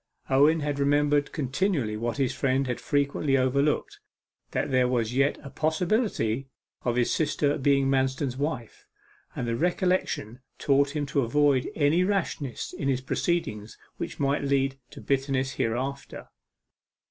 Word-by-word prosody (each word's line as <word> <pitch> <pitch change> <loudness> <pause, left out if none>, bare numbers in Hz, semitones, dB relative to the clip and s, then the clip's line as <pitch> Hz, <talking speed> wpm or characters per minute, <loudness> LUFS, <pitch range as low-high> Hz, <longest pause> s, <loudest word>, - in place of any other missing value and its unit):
Owen 150 +4 +5
had 145 -1 -2
remembered 145 +1 +2
continually 140 - -1
what 115 +3 -3
his 135 -1 +1
friend 135 0 +1
had 125 -2 -3
frequently 140 -1 +1
overlooked, 140 +3 0 0.5
that - - -2
there 130 -1 +3
was 120 -2 0
yet 135 +2 +2
a 140 - -9
possibility 160 - 0 0.3
of 120 -1 -1
his 125 -1 +1
sister 145 -2 +1
being 140 0 +3
Manston's 135 0 0
wife, 135 -5 -4 0.5
and 120 - -3
the 115 - 0
recollection 175 - 0 0.2
taught 140 +1 +2
him 145 -1 -1
to 140 0 0
avoid 135 +1 +2
any 155 +4 +3
rashness 175 - -2
in 140 - -3
his 130 -2 +1
proceedings 130 -7 -2 0.2
which - - -6
might 140 +1 +1
lead 135 -1 0
to - - -11
bitterness 135 -1 0
hereafter. 130 +4 -3
140 Hz, 140 wpm, -27 LUFS, 130-145 Hz, 0.5 s, Owen